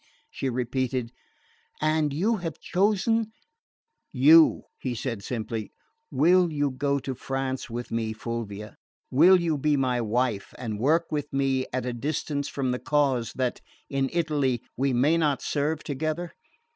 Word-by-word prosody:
she 135 - -2
repeated. 125 0 -2 0.7
"And 155 -1 +1
you 205 +11 +1
have 165 -5 -5
chosen 215 +4 +1 0.4
" 460 - -55 0.2
"You," 165 0 +7 0.2
he 125 -2 -3
said 115 -3 -4
simply. 110 -2 -4 0.4
"Will 170 +5 +4
you 145 -2 0
go 140 +2 0
to 135 -1 -4
France 135 0 -3
with 120 +1 -5
me, 115 -1 -1
Fulvia? 110 -2 -6 0.3
Will 175 +8 +7
you 165 -4 0
be 150 +1 +2
my 125 -2 +1
wife 115 -1 -1
and 110 -4 -4
work 160 +8 +2
with 145 -1 -2
me 135 -1 0
at 130 0 -2
a 125 - -2
distance 145 +3 -2
for 135 -2 -2
the 125 0 -1
cause 135 -6 +1
that, 130 -2 -2 0.3
in 135 -1 0
Italy, 145 -8 0
we 135 +2 +1
may 140 +7 +3
not 150 -4 +1
serve 150 +1 -1
together? 155 +4 -3
135 Hz, 150 wpm, -26 LUFS, 125-155 Hz, 0.7 s, You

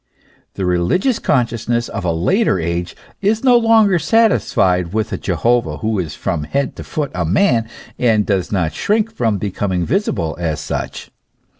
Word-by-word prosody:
The 95 - -2
religious 90 - +1
consciousness 120 -2 0
of 100 - -5
a 90 - +1
later 95 - +1
age 85 +1 -3 0.3
is 215 +3 +1
no 250 -2 +5
longer 225 -5 +4
satisfied 100 - +2
with 110 -1 -1
a - - -1
Jehovah 120 0 0
who 110 -2 -1
is 80 -5 -4
from 75 -3 -3
head 140 - -2
to - - -6
foot 150 -2 -3
a 90 - -1
man, 115 - +2 0.3
and 110 -4 +2
does 95 -3 -1
not 85 -6 0
shrink 220 - 0
from 115 - 0
becoming 95 -2 -2
visible 125 - -1
as 80 -3 -2
such. - - -5
110 Hz, 160 wpm, -18 LUFS, -, 0.3 s, no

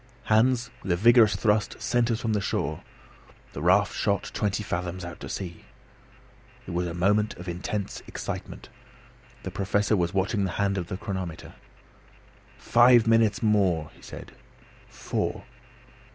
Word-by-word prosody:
Hans, 120 +2 +2
with 95 - -3
a - - +4
vigorous 115 +2 +5
thrust, 105 -2 0
sent 120 -1 +1
us 115 -1 0
from 115 -2 -1
the 105 - 0
shore. 75 -6 -2 0.7
The 70 - -6
raft 95 +4 +3
shot 100 -1 -1
twenty 105 0 -1
fathoms 90 -1 -4
out 85 - -8
to - - -8
sea. 85 -3 -6 1.0
It - - -7
was 90 +1 -1
a 85 - -5
moment 105 +4 +1
of 90 +1 -9
intense 95 +4 -4
excitement. - - -6 0.7
The - - -5
Professor 100 +2 +1
was 85 -3 0
watching 100 +2 0
the 95 -2 -2
hand 100 -1 +1
of 85 - -5
the 95 - -4
chronometer. 95 -5 -6 1.0
"Five 120 -1 +5
minutes 115 -1 +3
more!" 95 -8 +2
he - - -20
said. - - -10 0.6
"Four! - - -3
100 Hz, 150 wpm, -26 LUFS, 90-110 Hz, 1.0 s, vigorous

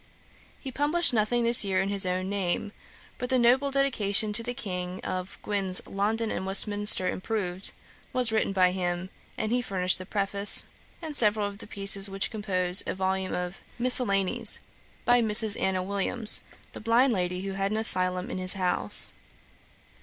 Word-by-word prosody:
He 265 - -8
published 295 +3 +1
nothing 235 +2 -1
this 235 -1 +5
year 190 -2 -2
in 195 +1 -2
his 200 -1 +2
own 185 +1 -3
name; 200 +1 -3 0.5
but 250 -1 -5
the 260 - +1
noble 250 +3 +2
dedication[*] 220 -7 0
to 225 - +3
the 245 +1 -6
King, 180 -3 -6
of 185 0 -7
Gwyn's 195 -3 +2
London 215 +3 -3
and - - -5
Westminster 205 0 +3
Improved, 190 -2 -1 0.4
was 250 -3 0
written 220 -2 -1
by 185 -2 +1
him; 180 0 -5 0.3
and 215 - -4
he 245 +1 0
furnished 185 -6 -1
the 185 - -10
Preface,[Dagger] 200 0 +2 0.3
and 310 -2 -7
several 210 -3 +6
of 200 0 -8
the - - -11
pieces, 200 -1 +2
which 195 0 -1
compose 185 -4 0
a - - -4
volume 190 0 -3
of 180 +1 -7 0.2
Miscellanies 235 -3 -1 0.5
by 245 0 +3
Mrs. 220 -1 +2
Anna 185 -1 -2
Williams, 200 +3 0 0.3
the - - -11
blind 235 +3 +1
lady 180 -2 -3
who 195 0 -6
had 195 0 -3
an 215 - -3
asylum 185 -4 +1
in - - -6
his 185 0 +3
house. 185 -2 +5
200 Hz, 170 wpm, -25 LUFS, 185-230 Hz, 0.5 s, several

